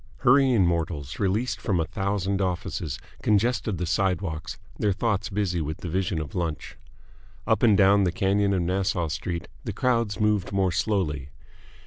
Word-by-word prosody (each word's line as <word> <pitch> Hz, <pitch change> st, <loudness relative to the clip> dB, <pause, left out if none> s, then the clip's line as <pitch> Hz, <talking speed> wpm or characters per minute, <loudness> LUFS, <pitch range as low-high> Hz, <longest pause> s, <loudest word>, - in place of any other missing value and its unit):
Hurrying 125 Hz, -5 st, +5 dB
mortals, 80 Hz, -5 st, -2 dB
released 105 Hz, +2 st, 0 dB
from 95 Hz, -4 st, 0 dB
a 80 Hz, -, +1 dB
thousand 100 Hz, +2 st, -1 dB
offices, 90 Hz, -4 st, -2 dB, 0.2 s
congested 110 Hz, -1 st, +1 dB
the 90 Hz, -, -2 dB
sidewalks, 90 Hz, -2 st, -1 dB, 0.2 s
their 105 Hz, -3 st, +2 dB
thoughts 105 Hz, -2 st, -1 dB
busy 95 Hz, -4 st, -1 dB
with 80 Hz, +1 st, -3 dB
the 90 Hz, -, -6 dB
vision 90 Hz, -1 st, -1 dB
of 75 Hz, -2 st, -6 dB
lunch. 85 Hz, -4 st, -3 dB, 0.7 s
Up -, -, +2 dB
and 110 Hz, -4 st, +5 dB
down 100 Hz, 0 st, +5 dB
the 90 Hz, -, +1 dB
canyon 100 Hz, +3 st, +1 dB
of 95 Hz, -3 st, +1 dB
Nassau 90 Hz, -2 st, 0 dB
Street 85 Hz, +3 st, -4 dB, 0.2 s
the -, -, -4 dB
crowds 115 Hz, -5 st, 0 dB
moved 105 Hz, -3 st, +1 dB
more 95 Hz, -2 st, +1 dB
slowly. 80 Hz, -9 st, -1 dB
95 Hz, 155 wpm, -26 LUFS, 85-105 Hz, 0.7 s, Hurrying